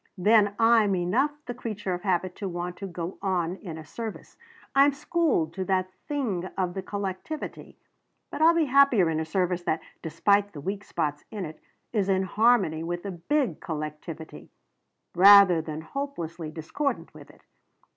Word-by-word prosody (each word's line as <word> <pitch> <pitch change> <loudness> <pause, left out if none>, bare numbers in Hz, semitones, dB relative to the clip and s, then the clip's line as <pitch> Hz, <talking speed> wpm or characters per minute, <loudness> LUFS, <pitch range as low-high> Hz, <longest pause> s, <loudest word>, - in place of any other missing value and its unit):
Then 205 +1 +4
I'm 225 -3 +4
enough 185 +11 +1 0.2
the 245 - -4
creature 210 -5 -4
of 175 - -4
habit 185 -1 -1
to 200 -3 -4
want 175 0 -4
to 195 - -6
go 175 0 -6
on 185 -2 -1
in 165 -6 -8
a 160 - -9
service; 225 +6 -7 0.4
I'm 275 +1 +5
schooled 300 - 0
to 190 -1 -3
that 185 -1 0 0.2
thing 235 -12 -2
of 180 -2 -1
the 190 - -4
collectivity. 200 +10 -6 0.5
But - - -5
I'll 330 +1 +6
be 330 -2 +3
happier 260 - +4
in 160 - -1
a 160 - -2
service 180 +1 0
that 160 - +1 0.2
despite 200 +5 +1
the 150 - -8
weak 195 +7 -4
spots 145 -1 -2
in 205 -4 -5
it 155 0 -9 0.3
is 200 -3 +1
in 190 0 +2
harmony 200 -5 +2
with 175 +1 -4
the 200 - -4
big 185 - -1
collectivity 155 +1 -7 0.6
rather 195 -2 +8
than 155 -1 -6
hopelessly 170 - -5
discordant 165 - -3
with - - -14
it. - - -20
190 Hz, 165 wpm, -27 LUFS, 170-220 Hz, 0.6 s, rather